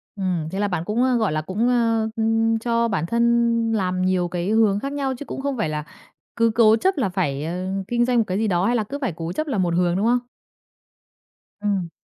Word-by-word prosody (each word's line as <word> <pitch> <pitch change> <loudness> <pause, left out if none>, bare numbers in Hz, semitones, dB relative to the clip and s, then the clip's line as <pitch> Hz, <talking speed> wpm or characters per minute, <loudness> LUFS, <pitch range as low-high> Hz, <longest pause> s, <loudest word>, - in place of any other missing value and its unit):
Ừm, 180 -5 -2
thế 195 - -3
là 205 - +1
bạn 180 -4 -2
cũng, 225 +4 0
ơ, 255 -1 +2
gọi 220 -7 +1
là, 155 0 -1
cũng, 205 +9 -1
ơ, 230 -2 +2
ừm, 225 0 +1
cho 235 0 +1
bản 165 -6 -1
thân 235 +6 0 0.5
làm 185 -3 0
nhiều 185 -1 +1
cái 175 +2 -3
hướng 215 -2 +3
khác 275 +4 -4
nhau, 275 -2 -1
chứ 290 - -8
cũng 270 - -6
không 280 -1 -2
phải 160 - -1
là 150 0 -3 0.5
cứ 230 0 +3
cố 220 -2 +6
chấp 375 +9 0
là 240 -8 +1
phải, 150 -6 -2
ờ, 180 +3 -3 0.2
kinh 240 +1 +1
doanh 250 -1 +1
một 230 - +4
cái 185 +1 -1
gì 220 0 0
đó, 180 -1 +1
hay 240 - +2
là 225 - +1
cứ 275 +7 -6
phải 255 -10 -1
cố 165 +1 -5
chấp 310 +7 -2
làm 210 -9 0
một 170 -1 0
hướng, 175 0 +2
đúng 200 +4 0
không? 245 +1 +3 1.4
Ừm. 195 -5 -1
215 Hz, 245 wpm, -22 LUFS, 180-235 Hz, 1.4 s, cố